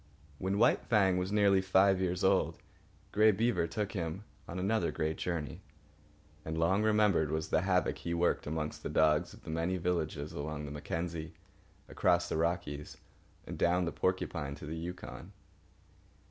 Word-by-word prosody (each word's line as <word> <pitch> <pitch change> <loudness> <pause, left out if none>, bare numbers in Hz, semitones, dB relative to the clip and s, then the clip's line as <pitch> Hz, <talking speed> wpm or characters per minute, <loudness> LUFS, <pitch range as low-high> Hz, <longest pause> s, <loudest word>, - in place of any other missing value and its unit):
When 95 +2 -1
White 110 - +4
Fang 95 -5 +3
was 90 +2 -2
nearly 100 -2 +4
five 95 0 +4
years 90 -1 -1
old, - - +2 0.5
Grey 110 +1 +5
Beaver 110 -4 +1
took 105 +4 -3
him 85 -1 -4 0.2
on 85 - -6
another 100 +4 +1
great 80 +1 -1
journey, 80 -6 -3 0.8
and 80 +1 -4
long 90 +5 +2
remembered 105 -7 +3
was 80 +1 -2
the - - +2
havoc 90 -1 +1
he 85 0 -3
worked 85 -2 +1
amongst 75 0 -3
the - - -4
dogs 80 +2 +3
of - - -18
the 80 - -6
many 85 +3 -1
villages 80 -4 -2
along 75 +1 -4
the 70 - -7
Mackenzie, 80 +2 -4 0.5
across 85 0 +2
the - - -2
Rockies, 80 -3 -2 0.5
and - - -7
down 90 +1 +3
the 85 - -2
Porcupine 85 -6 -2
to 75 - -10
the 80 +2 -5
Yukon. 85 +2 -7
85 Hz, 160 wpm, -32 LUFS, 80-95 Hz, 0.8 s, Grey